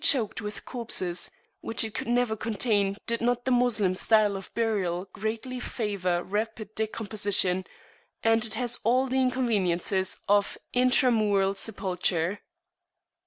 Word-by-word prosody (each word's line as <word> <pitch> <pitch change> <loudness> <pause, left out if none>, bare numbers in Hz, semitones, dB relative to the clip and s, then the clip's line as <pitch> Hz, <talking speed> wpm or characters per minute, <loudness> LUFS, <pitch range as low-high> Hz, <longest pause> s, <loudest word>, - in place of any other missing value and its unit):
It - - -12
must - - +11
be - - 0
choked 225 -2 -3
with 210 -1 -7
corpses, 200 -8 0 0.3
which 225 - +1
it 220 -2 -3
could - - -4
never 240 -2 +1
contain 210 -3 0
did 230 0 -1
not 245 +1 0
the 260 - 0
Moslem 240 -6 +3
style 210 +1 +3
of 195 -1 -8
burial 195 -6 -1
greatly 225 +5 -4
favour 195 -8 -2
rapid 215 +1 -4
decomposition; 205 -4 0 0.6
and 225 0 +3
it 220 -2 +1
has 240 0 -1
all 255 +3 +3
the 265 0 0
inconveniences 200 -7 0
of 205 0 +2 0.2
intramural 225 -6 +3
sepulture. 190 -2 0
215 Hz, 140 wpm, -27 LUFS, 195-235 Hz, 0.6 s, must